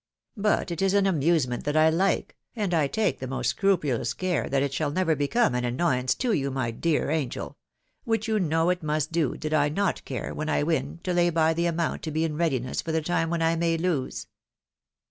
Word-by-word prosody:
But 205 -3 +1
it 170 - -3
is 195 0 +2
an 200 -1 +4
amusement 155 -8 +1
that 145 +1 0
I 160 +1 +5
like, 190 +4 0 0.2
and 205 -6 -1
I 155 -4 +3
take 215 +7 0
the 130 - -5
most 130 +1 -1
scrupulous 145 - 0
care 185 -4 -1
that 135 0 +1
it 140 -1 -2
shall 150 +1 0
never 165 +1 +1
become 145 - +1
any 125 0 0
annoyance 125 -1 +1
to 250 -3 0
you, 140 -6 0
my 130 -3 -2
dear 150 +4 0
angel! 150 -6 -3 0.5
which 225 -2 -1
you 220 -1 +1
know 165 0 +2
it 180 - -2
must 155 0 -1
do, 165 -5 0
did 155 0 -4
I 145 -1 +3
not 195 +5 0
take - - -16
care, 130 -3 -4
when 155 0 -3
I 145 - +1
win, 155 0 -1
to 180 - -1
lay 175 0 +3
by 160 -1 +2
the 170 +1 0
amount 170 -1 -1
to - - -4
be 160 +2 0
in 160 -2 -1
readiness 135 -6 -1
for 165 - -4
the 160 0 0
time 165 0 0
when 170 -1 0
I 165 +1 +2
may 165 0 +1
lose." 160 -6 -2
160 Hz, 225 wpm, -26 LUFS, 140-175 Hz, 0.5 s, I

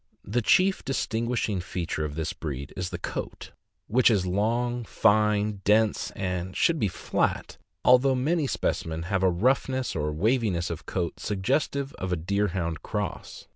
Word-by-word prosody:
The 115 +5 0
chief 190 - +3
distin 115 -3 -1
guishing 110 -6 -1
feature 85 -3 -3
of 75 -1 -4
this 80 -1 -2
breed 70 -3 -6
is 90 -1 -3
the - - -4
coat, - - -6 0.3
which 125 +3 +4
is 100 -5 +2
long, 120 +6 0
fine, 105 -2 +2
dense, 110 +1 +3
and 90 -1 -3
should 165 -2 +3
be 105 - +2
flat, 90 - -2 0.3
although 125 +1 +6
many 150 +4 +1
specimens 80 -8 -2
have 95 0 0
a 95 - +4
roughness 130 +6 +1
or 75 -1 -1
waviness 95 0 +1
of 85 +1 -7
coat 90 -3 -2
suggestive 135 +7 -1
of 95 0 -3
a - - +2
Deer 100 +5 0
hound 85 -3 -3
cross. - - -5
105 Hz, 160 wpm, -27 LUFS, 90-120 Hz, 0.3 s, although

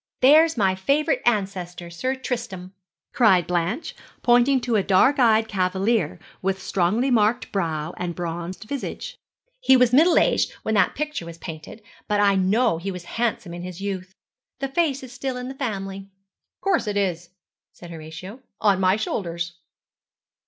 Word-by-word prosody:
'There's 310 +4 +6
my 195 -3 +3
favourite 280 - +1
ancestor, 185 -5 -1
Sir 255 +11 -2
Tristram,' 230 -8 -5 0.4
cried 190 -8 +4
Blanche 180 - -2 0.3
pointing 245 +2 +4
to 240 -1 -1
a 210 - +4
dark 210 +10 +3
eyed 225 -2 +4
cavalier, 190 - 0 0.2
with 190 0 -1
strongly 200 +9 0
marked 220 0 +2
brow 165 -4 -2
and 175 -1 -4
bronzed 175 +2 -5
visage. 275 +5 -5 0.4
'He - - +5
was 250 -1 +3
middle 325 +7 +6
aged - - +2
when 220 - -1
that 205 - +3
picture 300 - -4
was 170 -1 -9
painted, 165 +6 -9 0.2
but 210 -1 +1
I 200 -1 +4
know 195 +1 +2
he 190 +4 -4
was 180 -2 -6 0.2
handsome 210 -7 -1
in 175 - -7
his 180 0 -7
youth. 190 -1 -5 0.4
The 275 +1 -3
face 280 -2 0
is 255 -1 -10
still 260 0 -4
in 250 +1 -5
the - - -6
family.' 195 -7 -4 0.5
'Of - - -71
course 380 - +1
it 205 -1 -1
is,' 175 -4 -1 0.4
said 175 -1 -12
Horatio 165 +7 -9 0.2
'on 200 -3 +3
my 185 0 +3
shoulders.' 170 -5 -3
200 Hz, 160 wpm, -23 LUFS, 180-250 Hz, 0.5 s, There's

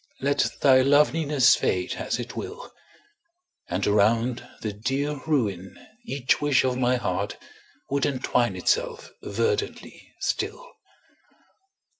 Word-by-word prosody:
Let 140 +1 +1
thy 130 -2 +6
loveliness 145 0 +4
fade 90 -1 -1
as - - -2
it 120 0 -6
will. 485 +4 -7 1.0
And 90 +3 -1
around 115 +4 +1
the 105 -2 -3
dear 135 +7 -2
ruin 100 - -1 0.3
each 135 - 0
wish 145 -4 +3
of 130 -1 0
my 125 0 +2
heart 100 -4 -2 0.5
Would 140 -1 +1
entwine 125 -3 0
itself - - -1
verdantly 425 -2 -3
still. 475 +5 -3
130 Hz, 110 wpm, -25 LUFS, 115-150 Hz, 1.0 s, thy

